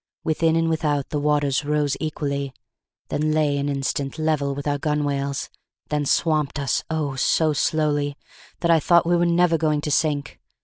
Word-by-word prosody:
Within 160 +1 +1
and 165 0 +2
without 150 -3 0
the 150 - -1
waters 145 -1 +1
rose 150 -1 0
equally 140 -3 -3 0.6
then 155 +1 0
lay 150 -2 +2
an 140 +1 -1
instant 140 +1 -2
level 155 -3 0
with 145 +1 -5
our 145 0 0
gunwales 140 -2 -1 0.4
then 150 -1 -1
swamped 155 -3 +1
us, 140 -2 0
oh! 155 -4 -2
so 155 +3 +2
slowly, 145 -1 0 0.4
that 170 - +3
I 165 - +5
thought 170 +2 +4
we 175 +1 +2
were 175 0 +2
never 170 -1 +3
going 150 -1 +1
to 150 - -3
sink. 145 -1 0
150 Hz, 170 wpm, -23 LUFS, 140-160 Hz, 0.6 s, I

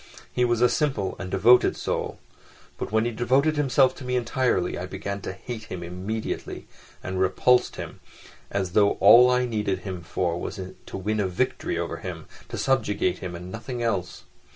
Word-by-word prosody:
He 125 - +1
was 120 -1 +1
a 125 - +7
simple 130 -10 0
and 95 - -5
devoted 120 +7 +5
soul; - - -3 0.6
but - - -4
when 110 +1 +2
he 120 - 0
devoted 130 +7 +2
himself 135 -2 +3
to - - -9
me 125 0 -2
entirely 120 -6 0
I 90 - -5
began 100 +1 -5
to - - -4
hate 110 +3 -7
him 90 -1 -6
immediately 95 +6 -5 0.4
and 95 0 -3
repulsed 120 +7 +3
him—as 95 -3 -7
though 100 +1 +4
all 120 +6 +7
I 125 0 +2
needed 105 -5 -1
him 95 -2 -5
for 85 0 -2
was 100 - -5 0.3
to - - -6
win 105 +3 -1
a 100 - +1
victory 90 - -1
over - - -3
him, - - -7 0.2
to - - -5
subjugate 105 -8 +1
him 90 -2 -6
and 90 +2 -8
nothing 120 +3 -5
else. 100 -6 -2
105 Hz, 175 wpm, -25 LUFS, 95-125 Hz, 0.6 s, a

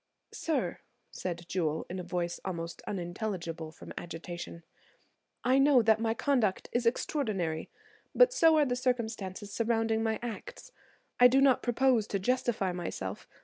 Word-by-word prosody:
"Sir," 320 -2 -1 0.3
said 170 -2 -5
Jewel, 160 -4 -1
in 185 +1 -5
a - - -4
voice 175 -1 -2
almost 170 -3 -5
unintelligible 175 -3 -4
from - - -11
agitation, 170 0 -7 0.8
"I 255 +2 +4
know 275 -3 +6
that 220 0 +4
my 225 0 0
conduct 235 -8 +1
is 240 -1 +1
extraordinary, 205 - -1 0.5
but - - +6
so 325 -8 +5
are 300 - +5
the 250 -2 0
circumstances 220 -6 -2
surrounding 225 -1 +1
my 220 -1 0
acts; 240 - -7 0.5
I 245 - +10
do 260 +2 +4
not 270 -2 +5
propose 240 -2 +2
to 200 - -1
justify 215 -2 0
myself. 105 - -5
220 Hz, 145 wpm, -30 LUFS, 175-250 Hz, 0.8 s, I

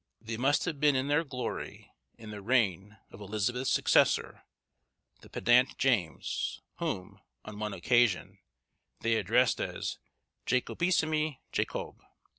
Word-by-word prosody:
They 115 +1 -5
must 135 +5 +2
have 160 -5 -3
been 145 -1 +4
in 130 +2 0
their 150 +3 +3
glory 125 -6 -6 0.3
in 110 -1 -10
the 105 -1 -7
reign 105 -3 0
of 100 - -12
Elizabeth's 110 +5 -1
successor, - - +3 0.8
the - - -16
pedant 125 +2 +3
James, 110 - 0 0.2
whom, 90 - -4 0.3
on 105 -1 -8
one 105 -1 -3
occasion, 120 +2 +2 0.6
they 115 0 +2
addressed 125 +2 +2
as - - -4 0.5
Jacobissime 155 +2 +1
Jacobe. - - -3
120 Hz, 120 wpm, -30 LUFS, 105-135 Hz, 0.8 s, been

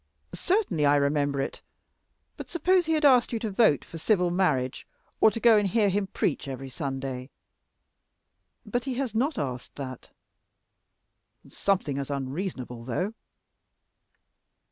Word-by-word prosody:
"Certainly 370 - 0
I 145 - +5
remember 145 0 +1
it. 135 - -3 0.7
But - - -9
suppose 355 +1 +2
he 325 - +2
had 305 -1 +2
asked 255 -3 +5
you 235 - -1
to 220 -1 -3
vote 195 - +3
for 165 - -9
civil 180 -1 +2
marriage, 150 -9 0 0.3
or - - +7
to 230 - -5
go 230 -1 +6
and 205 -1 +2
hear 205 +1 +2
him 195 +1 0
preach 155 -5 -1
every 135 0 -6
Sunday?" 135 -2 -4 1.4
"But 240 +4 -2
he 265 -2 -2
has 255 -4 -2
not 270 +8 0
asked 130 -3 -4
that." 130 -3 -7 1.4
"Something 180 -8 -1
as 140 - -4
unreasonable, 135 -3 -4
though." 180 - -2
175 Hz, 140 wpm, -27 LUFS, 135-230 Hz, 1.4 s, or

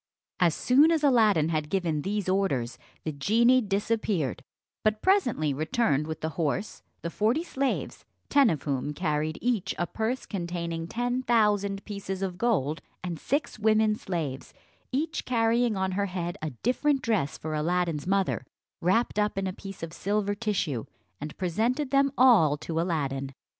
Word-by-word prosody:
As 170 -3 +3
soon 280 +6 +5
as 325 -2 +1
Aladdin 215 - +4
had 155 -2 -1
given 170 -5 0
these 205 +3 -2
orders, 180 -11 0 0.2
the 155 - -2
genie 230 - +4
disappeared, 200 - -1 0.4
but 215 0 +1
presently 245 - +2
returned 155 - 0
with 160 0 -5
the 160 - -1
horse, 165 +7 -2 0.2
the 170 - -3
forty 230 - +1
slaves, 275 -5 -2 0.2
ten 280 -4 +5
of 155 -6 -2
whom 140 0 -2
carried 155 -2 -1
each 235 -6 0
a 175 - 0
purse 225 +8 -2
containing 170 -3 -4
ten 245 +5 -1
thousand 205 -5 +1
pieces 195 -2 -5
of 180 -2 -4
gold, 165 - +1 0.2
and 175 -3 -4
six 285 -5 -2
women 215 0 +3
slaves, 160 -10 -4 0.4
each 310 +5 -1
carrying 230 -2 +2
on 190 0 0
her 200 +2 0
head 175 -2 -3
a 155 - -2
different 255 - 0
dress 195 -11 0
for 155 0 -5
Aladdin's 165 0 0
mother, 195 0 +1 0.4
wrapt 205 +5 +2
up 210 -1 0
in 195 - 0
a 185 - -2
piece 195 -2 -9
of 165 -1 -5
silver 205 +2 -1
tissue, 195 - -2 0.3
and 150 +1 -7
presented 230 - 0
them 275 0 +3
all 210 - +6
to 160 +2 -2
Aladdin. 140 -6 -2
195 Hz, 160 wpm, -27 LUFS, 160-230 Hz, 0.4 s, all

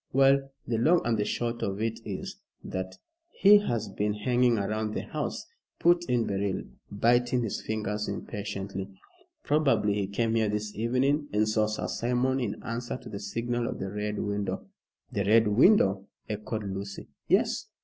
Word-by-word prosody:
"Well, 135 +1 +4 0.2
the 115 -2 -1
long 165 +8 +4
and 120 -1 +2
the 105 -1 0
short 120 0 -2
of 100 0 -2
it 115 0 -1
is, - - -5 0.3
that 95 0 -5 0.4
he 205 +1 +8
has 115 - -2
been 105 +1 -1
hanging 120 +3 +2
round 110 +1 -2
the - - -2
house," - - -4 0.3
put 175 0 +3
in 120 -2 +2
Beryl, 100 -1 -1 0.3
biting 120 +4 +2
his 110 - -3
fingers 105 -1 -2
impatiently. 100 -2 -5 0.5
"Probably 145 -8 +2
he 100 -1 -1
came 110 +3 0
here 110 -2 +2
this 105 0 -2
evening, 130 +6 +1
and 105 +1 +2
saw 110 0 +2
Sir 105 - -3
Simon 125 +2 0
in 115 -5 -3
answer 120 +1 -4
to - - -11
the 100 - -6
signal 115 +4 -2
of - - -4
the 95 - -4
Red 105 0 -3
Window." 100 0 -2 0.5
"The 100 - 0
Red 110 +3 +5
Window!" 105 - +4 0.2
echoed 105 +1 -4
Lucy. 100 0 -6 0.2
"Yes. - - +2
110 Hz, 165 wpm, -28 LUFS, 100-120 Hz, 0.5 s, he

